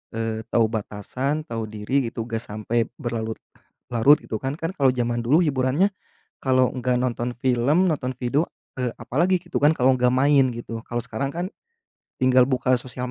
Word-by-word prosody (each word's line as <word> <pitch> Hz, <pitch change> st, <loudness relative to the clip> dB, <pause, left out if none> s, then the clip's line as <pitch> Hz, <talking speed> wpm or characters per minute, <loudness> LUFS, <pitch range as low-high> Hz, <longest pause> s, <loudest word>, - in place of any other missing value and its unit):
eee, 115 Hz, -1 st, -2 dB
tahu 115 Hz, -1 st, +3 dB
batasan, 125 Hz, +7 st, -3 dB
tahu 115 Hz, -4 st, -4 dB
diri, 115 Hz, +4 st, -1 dB
gitu, 115 Hz, -1 st, -5 dB
gak 115 Hz, -1 st, -3 dB
sampai 110 Hz, +2 st, -2 dB
berlarut-larut, 115 Hz, +3 st, 0 dB
gitu 110 Hz, -, -4 dB
kan. 135 Hz, +2 st, -2 dB
Kan, 165 Hz, +2 st, -3 dB
kalau 135 Hz, -2 st, +4 dB
jaman 120 Hz, -1 st, 0 dB
dulu 130 Hz, +8 st, +3 dB
hiburannya, 145 Hz, +6 st, +2 dB, 0.5 s
kalau 130 Hz, -1 st, +3 dB
enggak 125 Hz, -1 st, 0 dB
nonton 120 Hz, -1 st, -1 dB
film, 130 Hz, +9 st, +2 dB
nonton 130 Hz, -4 st, -2 dB
video, 135 Hz, +6 st, 0 dB, 0.3 s
eee, 125 Hz, -2 st, 0 dB
apa -, -, -9 dB
lagi, 185 Hz, +2 st, +4 dB
gitu 175 Hz, -1 st, -4 dB
kan, 145 Hz, +1 st, +6 dB
kalau 130 Hz, -1 st, +4 dB
nggak 125 Hz, -1 st, +2 dB
main, 135 Hz, 0 st, +4 dB
gitu. 115 Hz, -1 st, -6 dB
Kalau 120 Hz, -, -2 dB
sekarang 135 Hz, +2 st, -3 dB
kan, 175 Hz, +2 st, -2 dB, 0.8 s
tinggal 130 Hz, -1 st, +5 dB
buka 130 Hz, -1 st, +2 dB
sosial 125 Hz, 0 st, -6 dB
125 Hz, 170 wpm, -24 LUFS, 120-140 Hz, 0.8 s, kan